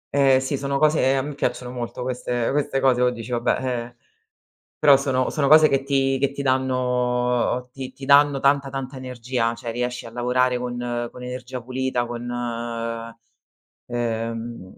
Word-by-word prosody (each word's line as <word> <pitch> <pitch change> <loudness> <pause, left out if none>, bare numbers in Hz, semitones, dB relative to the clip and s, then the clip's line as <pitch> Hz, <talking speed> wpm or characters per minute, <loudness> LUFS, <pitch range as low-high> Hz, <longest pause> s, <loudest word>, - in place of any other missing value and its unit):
Ehm, 135 -2 +5
sì, 135 +1 -2
sono 140 0 -1
cose 155 +1 +3
ehm, 135 +1 +3
a - - -5
me 150 - -5
piacciono 125 -3 -2
molto 125 0 -5
queste 125 -1 -2
queste 140 -1 0
cose, 130 -2 +3
o 125 - +4
dici: 120 -1 -7
Vabbè", 120 -1 +1
ehm, 120 -2 -3 0.8
però 145 -2 +7
sono 130 -2 0
sono 140 -3 +1
cose 155 +1 +8
che 135 0 +1
ti 135 -1 +1
che 140 0 +2
ti 140 0 -5
danno 125 -1 0
ti 130 -1 -7
ti 135 - -10
danno 140 0 +5
tanta, 140 0 +2
tanta 135 0 -5
energia, 125 -2 -2
cioè 115 0 -6
riesci 125 0 -3
a - - -9
lavorare 125 +1 +1
con 120 -1 -3
con 125 - -11
energia 125 0 -6
pulita, 130 0 -2
con, 120 0 -5 1.6
ehm, 115 -3 -4
125 Hz, 165 wpm, -23 LUFS, 120-135 Hz, 1.6 s, cose